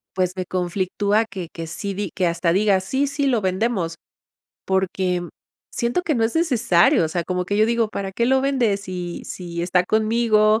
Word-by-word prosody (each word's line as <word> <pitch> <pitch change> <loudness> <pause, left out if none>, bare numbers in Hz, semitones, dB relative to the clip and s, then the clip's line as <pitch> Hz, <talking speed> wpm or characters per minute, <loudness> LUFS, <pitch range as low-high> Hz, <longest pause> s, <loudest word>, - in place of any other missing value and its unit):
pues, 185 -1 0
me 185 -1 -3
conflictúa 190 +4 0
que 190 -5 -7
que 165 -1 -6
sí 195 +5 -4
di 200 -2 -3
que 185 - -1
hasta 170 0 +1
diga 195 +1 +3
sí, 265 +10 -1
sí, 285 0 -1
lo 245 -4 +2
vendemos, 190 -3 -1 0.7
porque, 190 -1 0
mm, 175 - -7 0.5
siento 240 +9 0
que 315 - 0
no 230 - +1
es 225 +7 0
necesario, 235 - +3
o - - -1
sea, 170 +1 -2
como 180 0 -2
que 205 +3 -1
yo 215 +1 +4
digo: 235 -1 +1
"¿Para 195 -2 -5
qué 235 +4 0
lo 265 +1 +3
vende 260 -7 +1
si 180 -3 -6
si 170 -2 -6
está 180 0 +2
conmigo?", 215 +1 +3
195 Hz, 200 wpm, -22 LUFS, 180-230 Hz, 0.7 s, yo